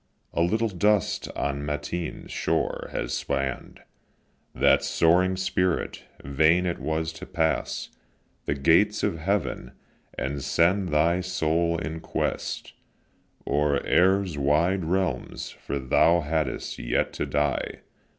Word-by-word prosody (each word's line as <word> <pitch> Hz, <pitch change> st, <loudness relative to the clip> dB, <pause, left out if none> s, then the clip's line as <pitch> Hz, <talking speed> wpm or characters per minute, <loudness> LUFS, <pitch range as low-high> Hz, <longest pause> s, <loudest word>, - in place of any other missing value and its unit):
A -, -, 0 dB
little 110 Hz, +7 st, +2 dB
dust 100 Hz, +1 st, +1 dB
on 70 Hz, 0 st, -2 dB
Matine 75 Hz, +3 st, -4 dB
shore -, -, -1 dB
has -, -, -3 dB
spann'd 70 Hz, -1 st, -3 dB, 0.7 s
That -, -, +4 dB
soaring 90 Hz, +3 st, +3 dB
spirit; 90 Hz, -1 st, -1 dB, 0.2 s
vain 80 Hz, +6 st, +3 dB
it 85 Hz, -1 st, -2 dB
was 80 Hz, 0 st, -2 dB
to -, -, -9 dB
pass 80 Hz, -1 st, -1 dB, 0.6 s
The 70 Hz, -, 0 dB
gates 85 Hz, +10 st, +3 dB
of 80 Hz, -, 0 dB
heaven, 95 Hz, -7 st, -2 dB, 0.4 s
and 70 Hz, +2 st, -3 dB
send 90 Hz, +3 st, +2 dB
thy 85 Hz, +4 st, +2 dB
soul 85 Hz, -1 st, 0 dB
in 80 Hz, -1 st, -4 dB
quest -, -, -3 dB, 0.7 s
O'er 70 Hz, 0 st, +1 dB
air's 95 Hz, -3 st, +3 dB
wide 80 Hz, +6 st, +2 dB
realms; 90 Hz, -7 st, -2 dB
for 70 Hz, -, -5 dB
thou 80 Hz, +6 st, +3 dB
hadst 80 Hz, +1 st, -2 dB
yet -, -, 0 dB
to -, -, -3 dB
die. 75 Hz, -1 st, -1 dB
80 Hz, 120 wpm, -26 LUFS, 75-90 Hz, 0.7 s, That